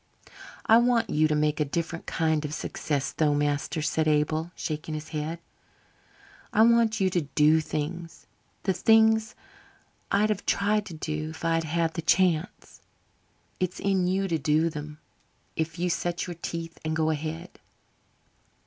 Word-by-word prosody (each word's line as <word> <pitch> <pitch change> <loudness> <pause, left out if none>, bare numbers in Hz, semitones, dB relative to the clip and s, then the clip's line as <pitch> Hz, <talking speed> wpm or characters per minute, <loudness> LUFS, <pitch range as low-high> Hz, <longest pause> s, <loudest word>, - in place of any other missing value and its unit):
"I 225 +1 +7
want 240 -1 +2
you 155 +1 +3
to 155 - 0
make 150 0 +1
a - - +3
different 165 +3 -4
kind 160 -2 0
of 150 +1 -4
success, 145 -3 -2
though, 150 -2 +1
master," 145 +2 -1
said 155 0 0
Abel, 155 +2 +1
shaking 155 0 -4
his 155 +1 -7
head. 155 +1 -3 1.1
"I 220 - +5
want 230 -1 +4
you 190 -1 +2
to 175 - +1
do 150 +2 +3
things 165 +3 -5 0.4
the 190 - +1
things 220 +1 +4 0.8
I'd 210 +2 +3
have 205 -1 -4
tried 210 +1 +1
to 170 - -8
do 155 0 -4
if 160 +1 -8
I'd 165 -1 +1
had 165 +1 0
the 165 - -3
chance. 175 +1 0 0.8
It's 185 0 -2
in 190 -2 +1
you 190 +1 0
to 165 -3 -1
do 155 +3 +2
them 150 0 -7 0.6
if 160 +1 -3
you 175 +1 0
set 175 0 -1
your 180 - -5
teeth 165 0 -5
and 155 0 -1
go 160 0 +1
ahead." 160 +3 -5
165 Hz, 160 wpm, -27 LUFS, 155-185 Hz, 1.1 s, I